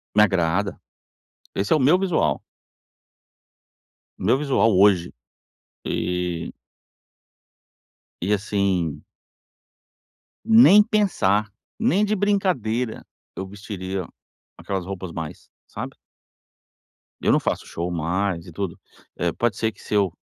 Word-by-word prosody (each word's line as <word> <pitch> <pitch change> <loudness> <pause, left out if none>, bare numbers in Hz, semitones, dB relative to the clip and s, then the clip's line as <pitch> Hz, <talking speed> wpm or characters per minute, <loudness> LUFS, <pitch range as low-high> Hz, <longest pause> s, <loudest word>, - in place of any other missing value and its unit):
Me 105 - +7
agrada, 95 0 +1 0.8
esse 100 +1 -1
é - - +6
o 150 - 0
meu 155 +8 +5
visual 170 - +1 1.8
o - - -9
meu 115 +7 +4
visual 135 -7 +2
hoje. 95 -3 +4 0.7
E 90 -2 -2 1.7
e 95 +4 +1
assim 100 -6 0 1.4
nem 225 -2 +8
pensar, 110 - +1 0.3
nem 215 -2 +2
de 215 - 0
brincadeira, 160 - 0 0.3
eu 95 - -4
vestiria 95 -2 -5 0.5
aquelas 95 -3 -4
roupas 95 -2 -6
mais, 80 -2 -7 0.2
sabe? - - -7 1.3
Eu - - +3
não - - +4
faço - - -2
show 85 +1 -4
mais 90 +2 -1
e - - -9
tudo, 95 0 -4 0.4
eh, 85 -1 0
pode 120 -4 0
ser 110 - 0
que - - -19
se - - -7
eu 100 -4 +3
100 Hz, 115 wpm, -23 LUFS, 90-130 Hz, 1.8 s, nem